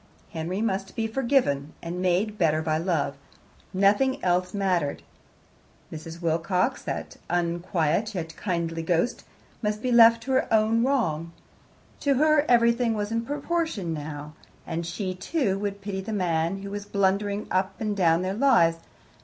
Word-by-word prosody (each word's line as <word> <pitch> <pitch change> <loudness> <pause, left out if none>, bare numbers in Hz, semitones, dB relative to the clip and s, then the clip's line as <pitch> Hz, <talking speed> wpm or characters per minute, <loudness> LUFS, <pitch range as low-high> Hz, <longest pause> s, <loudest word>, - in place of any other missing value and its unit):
Henry 175 +6 -3
must 195 -3 -2
be 225 -2 -1
forgiven, 225 - +1
and 175 +2 -5
made 190 +4 0
better 155 -2 +2
by 155 0 0
love; 165 -6 -1 0.5
nothing 205 +8 +3
else 180 0 +1
mattered. 185 -7 -1 0.9
Mrs. 160 +1 -8
Wilcox, 170 +7 0
that - - -5
unquiet 175 +3 0
yet 165 -2 -4
kindly 170 -4 -2
ghost, 170 +8 0 0.4
must 210 -1 -2
be 255 - 0
left 230 -1 +7
to 265 - -4
her 260 - +1
own 220 +1 +3
wrong. 170 - 0 0.7
To 280 -1 +2
her 305 +1 +4
everything 235 -1 +3
was 205 0 -3
in 230 0 0
proportion 290 - -2
now, 150 0 -6 0.3
and 165 0 -3
she, 185 +2 -3
too, 195 - -1
would 200 0 -4
pity 195 -1 -4
the 215 +3 -5
man 175 0 0
who 200 - -6
was 205 0 -5
blundering 200 +1 0
up 190 +1 0
and 215 -2 -1
down 170 -2 +3
their 185 +1 -1
lives. 215 -9 +4
195 Hz, 150 wpm, -26 LUFS, 170-225 Hz, 0.9 s, left